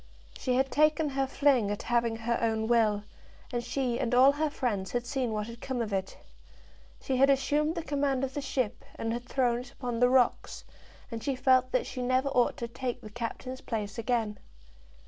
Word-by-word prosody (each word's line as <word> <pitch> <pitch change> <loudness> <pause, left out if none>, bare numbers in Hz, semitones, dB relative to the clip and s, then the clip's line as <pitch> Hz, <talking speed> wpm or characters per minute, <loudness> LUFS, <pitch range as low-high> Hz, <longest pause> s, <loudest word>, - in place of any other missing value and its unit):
She 255 -2 0
had 265 +1 +1
taken 305 +1 +3
her 270 -1 0
fling 265 -6 +3
at 205 - -3
having 235 -1 +1
her 230 +1 -1
own 220 -1 +1
will, 220 -3 +2 0.5
and 240 0 -1
she 245 0 -1
and 245 -2 0
all 260 +2 +7
her 305 +2 0
friends 215 -9 -2
had 245 0 -1
seen 255 -2 -1
what 210 -1 -2
had 235 +1 -10
come 260 -2 -3
of 220 -3 -2
it. 190 -1 -2 0.8
She 260 - -1
had 275 +2 +5
assumed 295 +4 +2
the 335 - -3
command 280 -3 0
of 265 0 -2
the 290 - -3
ship, 255 -4 -2
and 225 0 -2
had 240 +1 -6
thrown 245 -3 +1
it 250 0 -9
upon 245 -3 -4
the 245 0 +5
rocks, 255 -1 +2 0.5
and 225 -1 -5
she 275 - 0
felt 255 0 +3
that 255 - +1
she 255 - -5
never 255 +2 +1
ought 245 -3 +2
to 235 - -4
take 245 +1 -4
the 215 - -10
captain's 250 +3 -5
place 210 -2 -4
again. 225 -2 -1
245 Hz, 205 wpm, -29 LUFS, 230-270 Hz, 0.8 s, all